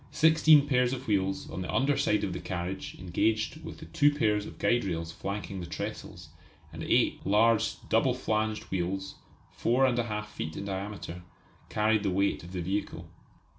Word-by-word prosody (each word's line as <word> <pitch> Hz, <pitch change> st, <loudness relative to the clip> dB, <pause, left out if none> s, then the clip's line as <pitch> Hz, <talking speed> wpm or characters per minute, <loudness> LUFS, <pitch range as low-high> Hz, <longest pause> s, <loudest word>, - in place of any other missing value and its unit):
Sixteen 160 Hz, -2 st, +6 dB
pairs 125 Hz, -3 st, +2 dB
of 130 Hz, 0 st, -5 dB
wheels 95 Hz, -2 st, 0 dB
on 85 Hz, +4 st, -4 dB
the 90 Hz, -, -4 dB
under 135 Hz, +2 st, +2 dB
side 105 Hz, -5 st, +1 dB
of 95 Hz, -, -2 dB
the -, -, -4 dB
carriage 90 Hz, +1 st, -4 dB
engaged 110 Hz, -, 0 dB
with -, -, -8 dB
the -, -, -10 dB
two 145 Hz, -3 st, +3 dB
pairs 105 Hz, -7 st, +1 dB
of -, -, -11 dB
guide 120 Hz, 0 st, +2 dB
rails 85 Hz, -3 st, -3 dB
flanking 100 Hz, +2 st, -5 dB
the 90 Hz, -, -6 dB
trestles, 80 Hz, -3 st, -6 dB, 0.4 s
and -, -, -7 dB
eight -, -, +2 dB
large 110 Hz, +2 st, +3 dB
double 120 Hz, +3 st, +3 dB
flanged 110 Hz, -3 st, -1 dB
wheels, 95 Hz, +1 st, -2 dB, 0.4 s
4 125 Hz, +3 st, +1 dB
1/2 120 Hz, -4 st, 0 dB
feet 80 Hz, -7 st, -6 dB
in -, -, -5 dB
diameter, 95 Hz, -2 st, -5 dB, 0.5 s
carried 110 Hz, 0 st, +2 dB
the 100 Hz, -, 0 dB
weight 100 Hz, +2 st, +1 dB
of 85 Hz, -, -10 dB
the 90 Hz, -1 st, -3 dB
vehicle. 95 Hz, -2 st, -3 dB
105 Hz, 170 wpm, -29 LUFS, 95-120 Hz, 0.5 s, Sixteen